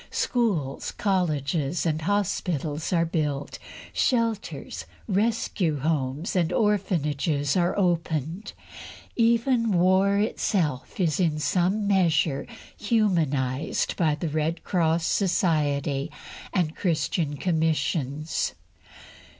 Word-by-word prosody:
Schools, 190 - -1
colleges, 160 -5 0
and 160 -1 0
hospitals 165 -5 -1
are 170 -2 +3
built; 150 -4 -2 0.3
shelters, 230 -4 -1 0.2
rescue 200 -6 0
homes, 150 +2 -1
and 175 -2 +2
orphanages 160 - +1
are 175 0 +1
opened; 170 0 -1 0.6
even 230 0 +2
war 190 +3 +4
itself 180 - -1
is 170 -3 +1
in 165 -4 +2
some 185 +6 +1
measure 165 -7 +2 0.3
humanised 160 - 0
by 155 -4 +2
the 155 +2 -3
Red 155 +2 -1
Cross 165 -2 +1
Society 150 -6 +1 0.4
and 170 -5 0
Christian 155 -3 -1
commissions. 160 -3 -1
165 Hz, 90 wpm, -26 LUFS, 150-195 Hz, 0.6 s, war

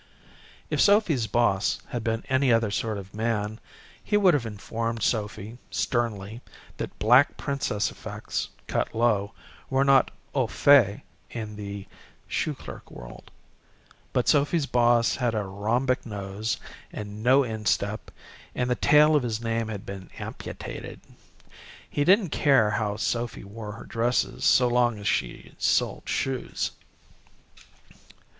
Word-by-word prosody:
If - - +2
Sophy's 190 - +4
boss 105 -3 +1
had 120 -2 -4
been 115 0 -1
any 130 0 +2
other 115 -2 +2
sort 110 0 -1
of 95 -1 -9
man 110 0 -2 0.4
he 210 - +2
would 195 -3 +5
have 130 -6 0
informed 115 +2 -4
Sophy, 110 +1 -2
sternly, 115 -2 -2 0.4
that - - -6
black 125 +6 +5
princess 135 -7 -1
effects, - - -5 0.2
cut - - -2
low, 110 -4 +1 0.4
were 135 +1 +2
not 135 -2 +5 0.2
au 130 -4 +1
fait 120 -6 +4 0.3
in 110 -2 -6
the 100 -1 -6 0.4
shoe - - -1
clerk - - -10
world. - - -11 0.8
But - - 0
Sophy's 145 +2 +3
boss 120 -2 +3
had 120 -3 0
a 105 - 0
rhombic 115 +7 0
nose, 105 0 -4 0.3
and 105 0 -7
no 130 +4 +5
instep, 110 -2 -1 0.5
and 125 0 0
the - - +3
tail 150 +4 +5
of 150 - +4
his 115 -3 -2
name 115 -1 -1
had 105 -3 -6
been 95 -1 -8
amputated. - - -7 0.9
He 145 - -1
didn't 190 +3 +4
care 135 -9 +4
how 105 -1 -1
Sophy 115 +1 -2
wore 105 +1 -8
her 115 - -10
dresses 120 +2 -1
so 125 - +5
long 120 -2 +2
as 100 0 -5
she 60 -10 -2
sold - - +1
shoes. 130 -2 -2
115 Hz, 135 wpm, -26 LUFS, 105-125 Hz, 0.9 s, would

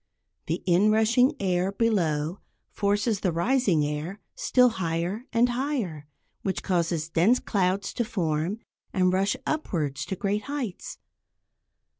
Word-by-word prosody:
The 165 +3 -2
inrushing 220 +7 +4
air 185 -1 +1
below 180 -6 0 0.3
forces 205 +1 0
the 185 - 0
rising 180 - +2
air 150 +7 -4
still 250 -1 +4
higher 180 +3 -2
and 235 +1 +3
higher, 240 - -2 0.3
which 190 - -2
causes 170 -3 0
dense 180 +10 +4
clouds 195 -1 0
to 240 - 0
form 180 -2 -2 0.3
and 185 -2 +2
rush 195 +5 +2
upwards 150 - -2
to 190 - -2
great 200 +3 -1
heights. 280 -10 -5
195 Hz, 120 wpm, -26 LUFS, 170-230 Hz, 0.3 s, inrushing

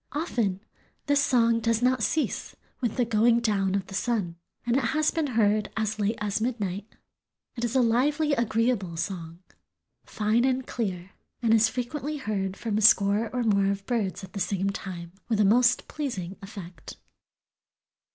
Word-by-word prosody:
Often 235 - -1 0.4
this 285 -1 +3
song 230 -5 +3
does 230 +1 0
not 255 -1 +2
cease 310 +8 -1 0.3
with 240 -1 -1
the 245 - +2
going 230 +1 +3
down 200 -4 +1
of 195 -2 -1
the - - -11
sun, 195 -4 -1 0.3
and 240 0 +1
it 270 - +2
has 310 0 +3
been 320 -3 -1
heard 210 -1 +2
as 215 0 -1
late 210 +2 0
as 210 0 -1
midnight. 210 -4 -2 0.7
It 235 - -5
is 240 +1 -1
a 260 - +5
"lively, 290 +6 +2
agreeable 230 -7 0
song, 170 -1 -5 0.6
fine 215 +3 0
and 260 0 +1
clear, 190 -5 -4 0.3
and 225 -1 +4
is 220 0 +5
frequently 280 +5 -4
heard 195 -7 -3
from 215 -2 -1
a - - -1
score 210 0 +4
or 250 -1 -1
more 200 -3 +3
of 195 0 -5
birds 205 -5 -2
at 190 - -10
the 200 - -4
same 195 +1 0
time 175 -3 -7 0.2
with 220 -3 +1
a 210 - +5
most 245 +4 +4
pleasing 200 - -4
effect." 190 -5 -10
220 Hz, 170 wpm, -27 LUFS, 195-245 Hz, 0.7 s, a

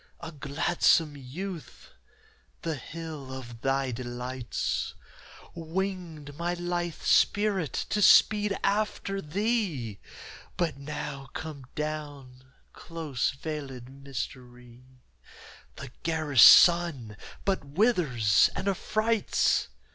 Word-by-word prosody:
A 170 -1 -7
gladsome 155 +1 +1
youth, 160 +6 -8 0.7
the 165 - -1
hill 155 -1 -8
of 120 -3 -9
thy 135 0 0
delights 125 +1 -4 0.6
Winged 165 -3 -5
my 175 +2 -2
lithe 175 -1 -3
spirit 200 -6 +2 0.2
to 210 - +1
speed 210 0 +5
after 200 -1 -1
thee, 170 - -2 0.6
But 170 -5 -1
now, 140 -1 -6
come 145 -5 -7
down, 145 -4 -6 0.2
close 155 -7 -3
veilëd 135 -6 -6
Mystery, 125 -2 -8 0.9
The 140 -3 -9
garish 155 -6 +2
sun 160 - +7 0.3
but 195 -5 0
withers 140 - +3
and - - -3
affrights. 215 +3 +1
150 Hz, 90 wpm, -28 LUFS, 130-175 Hz, 0.9 s, sun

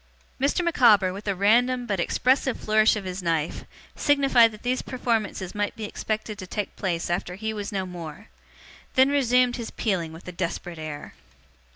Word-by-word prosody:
Mr. 285 +6 +1
Micawber, 215 - +5
with 205 +2 -9
a 200 - +1
random 245 +6 +3
but 200 -5 -2
expressive 260 +7 +1
flourish 215 0 +3
of 210 - -4
his 185 0 -5
knife, 165 -2 -1 0.3
signified 275 -5 +4
that 215 - -13
these 250 +1 0
performances 225 -7 -2
might 205 0 -2
be 220 - -7
expected 215 0 -4
to 185 - -7
take 205 +2 -4
place 175 -4 -2
after 175 +1 -2
he 220 +3 -3
was 205 -2 -5
no 190 -2 -2
more; 175 +2 -9 0.7
then 260 +1 +6
resumed 250 -3 +3
his 235 -2 -5
peeling 180 -7 -2
with 165 +3 -12
a - - -4
desperate 170 -1 -4
air. 150 -2 -7
210 Hz, 175 wpm, -25 LUFS, 180-245 Hz, 0.7 s, then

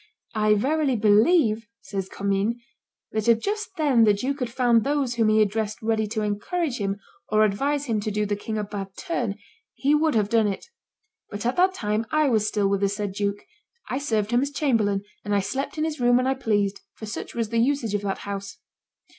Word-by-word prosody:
"I 215 -1 +3
verily 275 +4 +1
believe," 220 - +4
says 195 -1 -5
Commynes, 200 +3 0 0.6
"that 220 +1 -2
if 230 -1 +6
just 415 - -3
then 280 -7 +4
the 210 -2 +5
duke 270 +8 -2
had 250 -2 -2
found 235 -2 +3
those 280 -3 0
whom 225 -2 +2
he 215 0 +5
addressed 215 +1 -2
ready 220 -1 +1
to 215 0 -2
encourage 250 - -2
him, 200 0 -2 0.3
or 215 0 +4
advise 280 +8 0
him 225 -5 0
to 210 - -2
do 210 0 0
the 205 0 -1
king 215 +2 -4
a 210 - -1
bad 195 -2 -6
turn, 250 - -2 0.4
he 280 +2 +2
would 310 -1 +2
have 210 -2 +2
done 225 0 +3
it; 195 - -3 0.6
but 205 +2 -6
at 245 - +1
that 375 +1 +4
time 215 - -1
I 305 -2 +3
was 215 -3 +2
still 205 -2 +1
with 200 0 0
the 200 - +3
said 205 0 -3
duke; 200 +1 -2 0.4
I 260 - -1
served 220 -6 -1
him 240 +1 +3
as 280 - 0
chamberlain, 225 -10 +1 0.2
and 205 0 0
I - - +4
slept 265 +10 -3
in 310 - 0
his 315 -2 -2
room 245 0 +4
when 255 - +1
I 265 - +2
pleased, 205 -6 0
for 220 - -8
such 215 - -6
was 230 -2 -1
the 230 0 +1
usage 240 -3 +1
of 205 - 0
that 195 -1 -2
house. 200 -1 -5
220 Hz, 215 wpm, -25 LUFS, 205-265 Hz, 0.6 s, if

